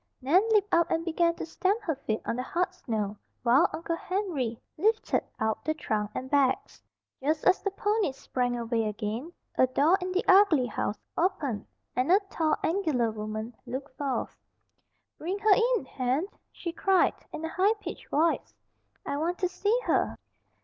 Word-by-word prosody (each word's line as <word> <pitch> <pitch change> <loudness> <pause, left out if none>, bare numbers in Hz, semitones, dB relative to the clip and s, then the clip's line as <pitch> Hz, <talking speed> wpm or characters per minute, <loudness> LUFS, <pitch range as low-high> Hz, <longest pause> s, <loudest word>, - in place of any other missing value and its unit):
Nan 290 +9 +4
leaped 420 -2 +3
out 340 0 +4
and 330 0 0
began 335 0 +2
to - - -5
stamp 380 +6 0
her 325 - 0
feet 225 -5 -3
on - - -1
the 250 - -2
hard 360 +7 -1
snow, 215 - -3 0.3
while 260 +9 +5
Uncle 335 0 -3
Henry 330 - -2 0.2
lifted 435 +7 +1 0.2
out 220 0 -1
the 310 +2 0
trunk 210 -8 -1
and 260 - -3
bags. 270 -1 +1 0.4
Just 300 +3 0
as 370 - +5
the 400 - 0
ponies 410 -7 0
sprang 245 -2 -1
away 230 -1 0
again, 215 - -3 0.3
a 255 - +6
door 305 +9 +3
in 365 0 -3
the 370 +1 0
ugly 375 -9 +6
house 220 -3 -2 0.2
opened 320 - -1 0.3
and 255 +6 +1
a 385 - +7
tall, 315 -2 +2
angular 310 - +1
woman 215 +2 -5
looked 260 +2 -6
forth. 275 -2 -2 0.8
"Bring 360 +5 -2
her 420 0 +5 0.2
in, 380 - -6
Hen!" 260 +5 -1 0.3
she 340 - -5
cried, 380 +1 +3 0.2
in 315 +1 -5
a - - -3
high 390 +6 +2
pitched 370 -4 -8
voice. 320 +3 +1 0.5
"I 280 - -2
want 340 +4 -1
to 365 - +1
see 405 +6 +1
her." - - +1
315 Hz, 170 wpm, -28 LUFS, 250-370 Hz, 0.8 s, a